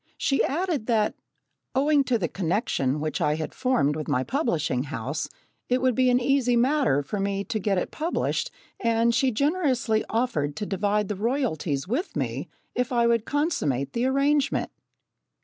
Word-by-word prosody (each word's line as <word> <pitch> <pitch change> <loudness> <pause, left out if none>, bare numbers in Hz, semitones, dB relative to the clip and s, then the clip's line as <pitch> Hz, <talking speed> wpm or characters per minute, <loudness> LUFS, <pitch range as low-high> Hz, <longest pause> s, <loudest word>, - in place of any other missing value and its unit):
She 275 - +2
added 315 - -1
that, 220 -3 +2 0.6
owing 285 +1 +4
to 250 -2 +2
the 180 -6 -1
connection 165 - -1
which 155 0 -2
I 150 0 +2
had 155 0 -4
formed 160 - +1
with 155 -1 -4
my 130 -4 +1
publishing 160 - 0
house, 145 +1 -4 0.4
it 250 +1 +3
would 255 0 +2
be 255 +1 +3
an 250 0 +4
easy 250 -1 +2
matter 245 - +2
for 205 +8 -4
me 200 0 -1
to 215 - -3
get 195 -1 0
it - - -2
published, 325 +3 -1 0.3
and 230 0 +2
she 255 +3 +3
generously 260 -4 +1
offered 190 - 0
to 210 - -3
divide 205 +1 0
the 210 - -2
royalties 190 - -1
with 270 - -2
me - - -3 0.2
if 250 0 -1
I 235 -1 +3
would 235 -1 +2
consummate 150 - 0
the 240 +2 +1
arrangement! 280 +1 +1
230 Hz, 165 wpm, -26 LUFS, 160-260 Hz, 0.6 s, owing